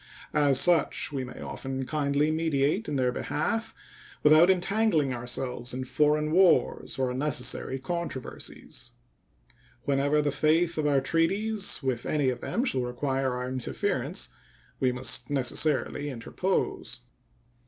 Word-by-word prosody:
As 145 -3 +3
such 170 -5 +3
we 135 -3 -3
may 125 - -9
often 135 0 -4
kindly 145 +1 +1
mediate 160 +5 0
in - - -2
their 125 -2 +2
behalf 225 - -2 0.5
without 155 +4 +7
entangling 185 - +2
ourselves 125 0 -3
in 130 - -3
foreign 150 +3 +1
wars 180 +1 +3
or 130 -1 0
unnecessary 130 -1 -1
controversies. 135 -2 -5 0.9
Whenever 140 +2 +2
the 145 -1 +1
faith 160 +3 +2
of 150 - +1
our 140 -2 +3
treaties 195 +6 0
with 125 -3 -2
any 145 -4 +1
of 125 -1 -3
them 245 - -1
shall 130 - +1
require 130 +1 -1
our 125 0 -3
interference, 130 -1 -2 0.5
we 130 - +2
must 125 - +1
necessarily 145 +1 +1
interpose. 145 +9 -2
145 Hz, 125 wpm, -28 LUFS, 130-160 Hz, 0.9 s, without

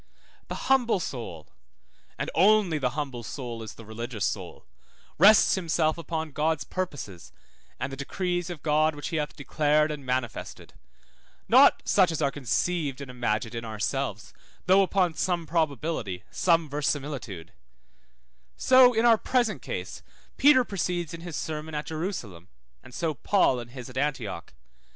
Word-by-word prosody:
The - - -5
humble 245 -6 +3
soul 115 - -6 0.7
(and - - -3
only 190 -3 +4
the 130 +1 -2
humble 135 -5 -3
soul 120 -1 -6
is 110 - -8
the 115 - -12
religious 110 0 -4
soul) - - -5 0.5
rests 205 +5 +7
himself 165 -3 +1
upon 160 -1 -4
God's 155 +2 0
purposes 145 - -6 0.5
and - - -3
the - - -3
decrees 175 +5 -2
of 170 -5 -7
God 155 0 +2
which 145 +2 -5
he 165 - -2
hath 150 -1 -3
declared 150 +2 +1
and 150 -2 -6
manifested, 125 -3 -4 0.7
not - - +6
such 185 -4 +4
as 160 - -3
are 140 -3 +1
conceived 145 +2 -1
and 140 -2 -7
imagined 115 -2 -2
in 115 0 -4
ourselves, 110 +1 -3 0.3
though 190 +2 +6
upon 185 -3 +1
some 175 0 -1
probability, 150 - -2
some 165 -3 +2
verisimilitude; 140 - -3 1.0
so 255 -1 +6
in 225 +2 +3
our 230 -2 +6
present 245 -4 0
case - - -6 0.3
Peter 270 -2 +6
proceeds 175 -6 -3
in 165 - -7
his 170 -2 -7
sermon 155 +1 -4
at 150 - -3
Jerusalem, 155 - -5 0.3
and - - -15
so 160 +4 -2
Paul 145 -4 +2
in 120 - -7
his 125 0 -9
at 130 0 -10
Antioch. 125 -12 -3
150 Hz, 150 wpm, -27 LUFS, 125-175 Hz, 1.0 s, rests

